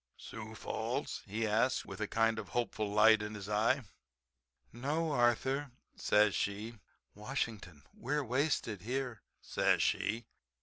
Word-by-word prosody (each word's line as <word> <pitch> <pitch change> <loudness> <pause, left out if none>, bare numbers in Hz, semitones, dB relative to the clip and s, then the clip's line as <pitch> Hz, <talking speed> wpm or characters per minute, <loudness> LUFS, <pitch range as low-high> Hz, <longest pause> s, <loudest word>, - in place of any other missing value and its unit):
"Sioux - - -8
Falls?" - - -3
he 110 +3 -1
asks 115 +4 +2
with 95 +2 -8
a 105 - 0
kind 115 0 +2
of 100 -4 -7
hopeful 110 -3 -1
light 110 +1 +6
in 105 0 -5
his 100 -2 -7
eye. 115 +6 +2 0.9
"No, 150 +7 -1
Arthur," 130 +2 +2 0.3
says 105 -1 +4
she, 105 +3 -2 0.3
"Washington. 105 - -4
We're 145 +4 -1
wasted 125 - 0
here," 125 -1 -3 0.2
says - - +2
she. 115 +2 0
115 Hz, 130 wpm, -34 LUFS, 105-130 Hz, 0.9 s, light